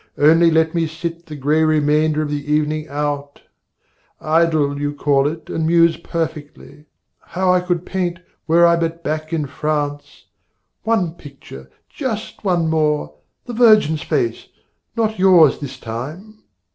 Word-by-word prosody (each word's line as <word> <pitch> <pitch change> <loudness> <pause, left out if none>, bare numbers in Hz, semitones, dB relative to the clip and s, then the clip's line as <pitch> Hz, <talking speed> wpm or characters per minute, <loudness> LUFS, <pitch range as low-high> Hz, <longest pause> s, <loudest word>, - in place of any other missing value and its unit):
Only 165 +3 +5
let 160 0 +2
me 165 -2 0
sit 170 +1 -6
The 155 - -8
grey 150 +3 +1
remainder 155 0 +2
of 145 - -4
the 145 0 -4
evening 155 +1 0
out, 145 0 -4 0.8
Idle, 155 -3 +1
you 145 0 -2
call 140 -1 +2
it, 155 +1 -6
and 160 -1 -2
muse 170 0 +4
perfectly 150 -3 -6 0.3
How 185 +1 0
I 180 - +2
could 180 -1 -2
paint, 180 -2 -2 0.3
were 170 +2 +5
I 170 0 +4
but 165 0 -3
back 155 +1 -3
in 160 -3 -1
France, 145 0 -4 0.6
One 220 -7 0
picture, 135 - -13 0.2
just 230 -8 -5
one 175 -4 +1
more 150 - 0 0.3
the 245 - -7
Virgin's 215 -10 +4
face, 360 -2 -2 0.5
Not 220 -2 -1
yours 180 -6 +5
this 140 -3 -8
time! 155 - -8
160 Hz, 145 wpm, -19 LUFS, 150-170 Hz, 0.8 s, Only